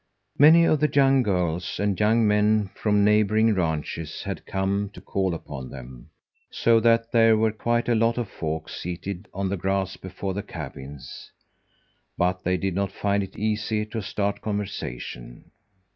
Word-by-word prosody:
Many 160 +4 +8
of 155 - +3
the 150 +1 +2
young 135 -1 +4
girls 90 -5 -1
and 100 -3 0
young 110 +1 +3
men 105 -1 +2
from 105 -1 +2
neighbouring 110 +1 +3
ranches 80 -3 -3
had - - -6
come 100 +1 -1
to - - -10
call 95 -1 -1
upon 70 -5 -8
them, 65 -2 -11 0.4
so 115 -1 +3
that 115 0 +2
there 115 -1 +5
were 110 0 +2
quite 120 +2 -1
a 120 - +3
lot 115 +1 +2
of 120 -3 -2
folk 80 -2 -4
seated 90 +3 -6
on 95 +1 -2
the 100 - -2
grass 95 +1 -1
before 95 +1 -5
the 100 - -3
cabins, 70 - -9 0.9
but 90 +1 0
they 90 +1 +1
did 95 0 -2
not 100 +1 -1
find 100 0 0
it 95 -1 -7
easy 110 0 -1
to 110 +1 -5
start 100 +1 -2
conversation. 60 - -6
100 Hz, 160 wpm, -25 LUFS, 90-110 Hz, 0.9 s, Many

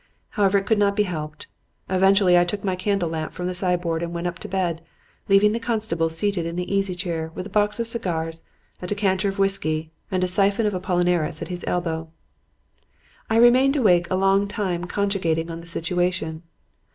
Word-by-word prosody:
However, 200 -1 +2
it 195 - -1
could 220 -1 +2
not 200 -1 +2
be 210 - +3
helped. 155 -5 -5 0.4
Eventually 190 0 +4
I 175 - +6
took 200 +3 -3
my 190 -2 0
candle 190 -1 0
lamp 160 -1 -4
from 180 - -5
the 180 - -1
sideboard 180 -2 0
and 170 0 -3
went 170 +1 -3
up 175 +1 -3
to - - -7
bed, 175 -4 -1 0.5
leaving 195 +1 +5
the 230 - -1
constable 215 -8 -1
seated 175 +2 -1
in 170 - -5
the 180 +2 -3
easy 195 -2 0
chair 165 -3 -3
with 185 - -5
a 205 - -9
box 210 +2 +1
of 230 - -1
cigars, 165 -8 -3 0.4
a 180 - -5
decanter 200 -1 +1
of 195 - -5
whiskey 160 -5 0 0.2
and 185 -1 0
a - - +2
siphon 200 +4 +2
of 210 - +1
Apollinaris 175 -3 0
at - - -8
his 180 -1 -5
elbow. 165 -2 -2 1.2
"I 225 - +1
remained 255 +4 +5
awake 180 -10 +3
a 185 - +1
long 195 +1 +3
time 185 -4 -2
cogitating 180 -4 -1
on 165 0 -6
the 170 - -13
situation. 170 -1 -1
185 Hz, 195 wpm, -23 LUFS, 170-200 Hz, 1.2 s, I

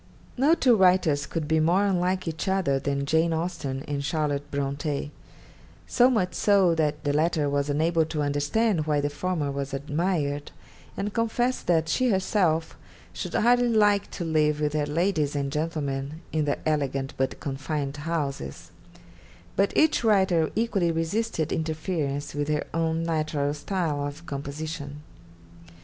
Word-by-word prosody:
No 285 +6 +4
two 250 -7 +4
writers 180 -7 +3
could 160 -3 -3
be 160 +1 +2
more 175 +6 +3
unlike 185 -1 0
each 160 +4 -3
other 185 -8 +1
than 140 0 -1
Jane 160 +3 +2
Austen 160 -5 -3
and 140 -1 -2
Charlotte 145 -1 -1
Bronte; 140 +1 -2 0.7
so 250 0 +4
much 185 -8 +1
so 195 -1 +4
that 150 -2 0
the 145 -2 0
latter 155 0 +1
was 140 0 0
unable 160 +3 +2
to 155 -1 -2
understand 155 +5 +1
why 150 -1 +2
the 145 0 -1
former 155 -2 -2
was 140 0 -3
admired, 145 0 -1 0.5
and 205 +1 -3
confessed 240 +2 0
that 165 -2 +3
she 255 +9 +1
herself 185 -5 +1 0.4
'should - - -5
hardly 245 +1 +4
like 205 -3 +3
to 175 - -5
live 150 -2 +2
with 150 -1 0
her 150 -1 0
ladies 155 -2 0
and 140 -1 -1
gentlemen, 150 -1 -3
in 155 -1 0
their 145 - 0
elegant 140 -3 -1
but 130 0 -2
confined 140 +1 -3
houses;' 145 - -4 0.8
but 200 +1 +2
each 310 -5 +3
writer 190 -7 +3
equally 205 -6 +1
resisted 165 +1 -1
interference 155 -3 -2
with 145 0 -2
her 150 -1 0
own 165 0 0
natural 155 -3 -1
style 150 -3 -2
of 150 +4 -9
composition. 145 0 -6
155 Hz, 150 wpm, -26 LUFS, 145-180 Hz, 0.8 s, No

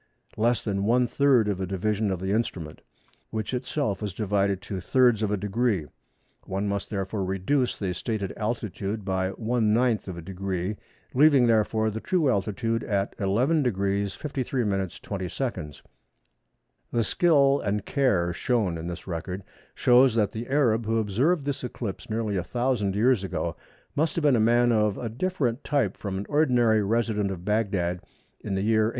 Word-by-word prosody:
less 120 +2 +1
the 105 - -2
one 120 +5 +3
third 130 -3 +3
of 100 -2 -1
a 95 - -2
division 105 +3 0
of 95 -2 -2
the 95 +1 -2
instrument, 95 -8 -2 0.5
which 110 +2 -4
itself 125 -3 -2
was 100 -4 -4
divided 100 -2 0
to 95 -1 -6
thirds 120 +2 +3
of 105 - +1
a 105 - 0
degree. 105 -2 0 0.6
One 95 +2 -2
must 100 0 -2
therefore 100 -1 -2
reduce 95 +8 0
the 95 -3 -2
stated 100 +1 -3
altitude 105 -2 -3
by 95 -1 0
one 110 +1 0
ninth 120 -3 +1
of 90 -3 -6
a - - -6
degree, 95 +1 -3 0.4
leaving, 140 -2 +6
therefore, 110 -1 +2
the 110 - -4
true 160 -1 +1
altitude 115 +2 -1
as 100 -1 0
11° 125 +11 +2
53′ 100 - -1
20″." 95 - -4 1.1
The 115 - +1
skill 140 0 +3
and 105 0 -1
care 100 -11 +1
shown 100 -5 0
in 80 - -5
this 90 0 -6
record 90 +2 -5 0.3
shows 125 -1 +5
that 105 -3 +2
the 115 +2 -6
Arab 120 -6 +2
who 115 +1 +1
observed 130 - +1
this 140 -2 -3
eclipse 115 -5 -5
nearly 110 -2 -1
a 90 - -1
thousand 120 -2 0
years 115 -1 +3
ago 95 - -3 0.4
must 155 +2 +1
have 170 - -1
been 145 -3 +5
a - - +2
man 120 +2 +4
of 105 -3 +2
a 115 - -4
different 130 -2 -1
type 135 -10 0
from 100 -2 -4
an 100 - -4
ordinary 125 -7 +3
resident 105 -1 0
at 90 -2 -6
Bagdad 100 -5 0 0.4
in 100 - -4
the 95 - -1
year 110 0 +3
1899. - - +1
110 Hz, 170 wpm, -26 LUFS, 95-120 Hz, 1.1 s, leaving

